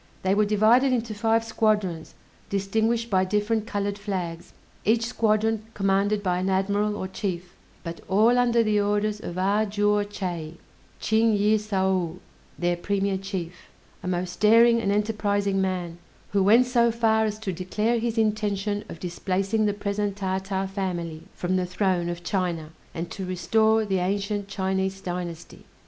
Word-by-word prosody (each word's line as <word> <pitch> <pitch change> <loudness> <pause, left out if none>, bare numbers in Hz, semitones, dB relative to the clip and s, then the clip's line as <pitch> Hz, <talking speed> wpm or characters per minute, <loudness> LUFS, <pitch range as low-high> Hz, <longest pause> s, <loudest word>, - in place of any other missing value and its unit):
They 190 0 +2
were 210 +1 +3
divided 220 +6 +4
into 230 -3 -1
five 225 +1 +1
squadrons, 210 -7 0 0.3
distinguished 220 +4 0
by 185 -1 +3
different 210 +3 0
colored 205 -1 -2
flags: 180 -5 -4 0.3
each 230 +2 +2
squadron 220 -2 +1
commanded 200 +1 +1
by 180 -2 +1
an 185 +1 -1
admiral, 200 +2 +1
or 190 - -3
chief; 180 -2 -4 0.3
but 170 -1 -6
all 220 +6 +4
under 235 -1 +3
the 210 -1 +2
orders 210 +1 0
of 175 -3 -6
A 200 +3 +2
juo 205 0 +2
Chay 175 -5 -5 0.4
(Ching 220 0 +2
yĭh 210 +2 +3
saou), 190 -5 0 0.4
their 175 0 +1
premier 200 +2 0
chief, 185 -3 -6 0.3
a - - -6
most 180 0 -3
daring 230 +2 +6
and 200 - 0
enterprising 205 -2 0
man, 180 -3 -2 0.3
who 200 - +2
went 225 +6 +6
so 240 -1 +3
far 220 -1 +2
as 215 -1 -2
to 210 -4 -4
declare 210 +6 -1
his 230 0 -2
intention 210 -2 0
of 165 - -8
displacing 195 +5 -1
the - - +2
present 205 0 -2
Tartar 190 0 -2
family 180 -5 -4
from 185 +1 -1
the 180 - 0
throne 180 -2 0
of 175 0 -5
China, 175 -4 -2 0.2
and 165 +1 -4
to 195 - -5
restore 220 +5 +2
the 190 -2 0
ancient 200 +2 -1
Chinese 190 0 -1
dynasty. 175 -3 -6
200 Hz, 155 wpm, -25 LUFS, 185-215 Hz, 0.4 s, daring